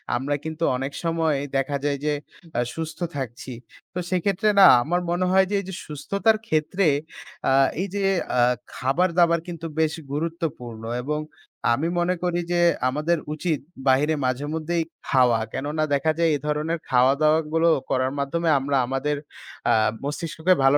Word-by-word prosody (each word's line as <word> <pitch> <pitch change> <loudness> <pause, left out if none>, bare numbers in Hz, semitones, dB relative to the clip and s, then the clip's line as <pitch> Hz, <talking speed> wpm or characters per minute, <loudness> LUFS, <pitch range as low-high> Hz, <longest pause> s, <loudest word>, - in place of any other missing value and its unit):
আমরা 135 +4 -1
কিন্তু 160 +1 -4
অনেক 135 +2 -4
সময় 165 -3 +1 0.2
দেখা 135 +1 0
যায় 145 -1 0
যে, 150 - +2 0.4
আ - - +3 0.2
সুস্থ 160 -1 -5 0.2
থাকছি। 130 0 -5 0.4
তো, 180 - -3
সেক্ষেত্রে 195 +3 +1
না 195 - +10 0.2
আমার 175 +6 0
মনে 175 +1 +1
হয় 190 0 +5
যে, - - +1
এই - - -12
যে - - -6
সুস্থতার 200 +9 +1
ক্ষেত্রে 160 +4 +1 0.6
আ - - +3 0.3
এই 195 - -1
যে 200 - -1 0.4
আ - - +6 0.3
খাবার 140 +9 +1
দাবার 170 -1 +4
কিন্তু 170 -2 -6
বেশ 160 -1 +2 0.2
গুরুত্বপূর্ণ 150 -7 -4 0.2
এবং 150 +3 -1 0.5
আমি 140 +7 0
মনে 175 +1 +1
করি 175 -1 0
যে, 175 0 +2 0.3
আমাদের 155 +6 0 0.2
উচিত 155 -1 -1 0.3
বাহিরে 145 +4 +3
মাঝেমধ্যেই 155 +6 -1 0.2
খাওয়া। 125 -4 +4
কেননা, 150 +3 -2
দেখা 140 +3 +2
যায় 165 -1 +4
এ - - 0
ধরনের 155 +3 -1
খাওয়া 130 +1 +5
দাওয়া 155 +1 +5
গুলো 165 +1 +4 0.2
করার 130 0 +1
মাধ্যমে 165 +4 0
আমরা 140 +1 0
আমাদের 135 +4 -1 0.6
আ - - +5 0.3
মস্তিষ্ককে 160 +4 0
ভালো 135 +2 +6
155 Hz, 160 wpm, -24 LUFS, 140-170 Hz, 0.6 s, না